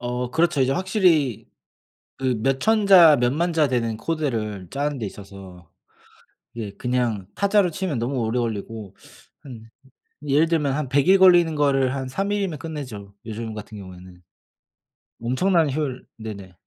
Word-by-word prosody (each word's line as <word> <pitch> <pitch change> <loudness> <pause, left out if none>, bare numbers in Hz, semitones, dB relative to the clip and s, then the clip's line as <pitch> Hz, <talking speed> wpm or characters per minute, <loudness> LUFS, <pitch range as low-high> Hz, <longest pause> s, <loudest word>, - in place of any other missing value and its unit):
어 125 0 -3
그렇죠. 160 -2 +1
이제 130 +1 +2
확실히 175 - +1 0.7
그 130 -1 0
몇 135 0 +1
1000 220 -2 +2
자 170 -6 +8
몇 120 0 +2
10,000 170 +4 0
자 155 -3 +2
되는 115 -3 -1
코드를 115 - -3
짜는 145 0 -2
데 110 - -4
있어서 95 -4 -12 0.8
그게 110 -4 -6
그냥 120 -6 -1
타자로 200 -2 +2
치면 165 - -3
너무 125 +3 -2
오래 115 +1 -1
걸리고 110 -3 -5 0.5
한 115 -5 -12 0.6
예를 145 +4 +3
들면 150 -5 0
한 150 -2 -3
100 140 +3 +2
일 190 +1 +6
걸리는 175 -3 +6
거를 135 -3 +2
한 135 -1 -4
3 195 +9 -2
일이면 195 -6 -1
끝내죠 130 -11 -7
요즘 110 0 -6
같은 105 0 -9
경우에는. 90 -2 -12 1.0
엄청난 160 +5 +2
효율 135 -3 -3
네네. 100 -4 -8
130 Hz, 270 characters per minute, -23 LUFS, 110-160 Hz, 1.0 s, 자